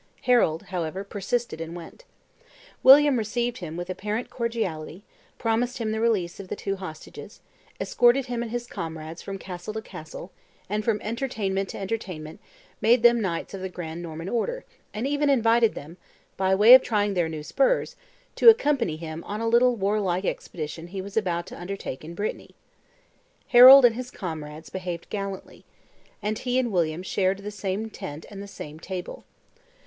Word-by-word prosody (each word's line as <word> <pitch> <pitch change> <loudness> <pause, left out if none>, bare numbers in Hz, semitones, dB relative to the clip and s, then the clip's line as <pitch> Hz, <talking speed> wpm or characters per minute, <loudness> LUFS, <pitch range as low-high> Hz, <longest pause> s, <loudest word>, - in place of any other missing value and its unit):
Harold, 235 -11 +3
however, 180 +2 -3
persisted 205 0 -3
and 165 +1 -6
went. 175 - -11 0.8
William 280 0 +8
received 235 +2 -2
him 165 -3 -6
with 175 0 -4
apparent 210 +5 -4
cordiality, 200 -8 -3 0.3
promised 235 +2 0
him 225 -3 -2
the 220 - -2
release 205 -7 0
of 195 - -8
the - - -4
two 195 -1 -3
hostages, 185 -5 -10 0.4
escorted 245 +2 +3
him 245 -2 -3
and 235 - -4
his 240 +1 -3
comrades 160 -5 -7
from 195 0 -6
castle 185 +2 -7
to 220 - -3
castle, 160 +2 -10 0.4
and 210 +2 -2
from 215 -1 +1
entertainment 210 -5 -2
to - - -7
entertainment, 185 -7 -5 0.4
made 230 +2 +4
them 240 -1 +6
knights 175 -3 -3
of 195 - -6
the 190 - -4
grand 170 -2 -6
Norman 165 0 -7
order, 485 - -2 0.3
and 220 +4 -4
even 290 +1 +1
invited 230 -3 +3
them, 160 +5 -9 0.4
"by 190 0 +2
way 215 +5 +8
of 260 - +10
trying 205 -4 0
their 175 -3 0
new 155 -2 -6
spurs," - - +1 0.4
to 465 - +8
accompany 285 - +3
him 160 0 -7
on 210 +1 -4
a 230 - -1
little 240 +2 +4
warlike 195 -3 0
expedition 165 -1 -5
he 190 +2 -6
was 200 +1 -7
about 175 -6 0
to - - -10
undertake 180 -7 -6
in 165 +2 -9
Brittany. 205 +4 -5 0.9
Harold 255 +2 +10
and 235 - +5
his 250 +2 -6
comrades 155 -6 -7
behaved 180 -3 -5
gallantly: 195 -2 -6 0.6
and 215 +1 -1
he 250 0 -1
and 250 -3 +1
William 170 -2 0
shared 190 0 0
the 200 +1 -7
same 205 +1 -3
tent 150 -4 -8
and 200 -1 -8
the 200 - -8
same 155 -5 -9
table. 180 +1 -7
200 Hz, 170 wpm, -25 LUFS, 175-235 Hz, 0.9 s, of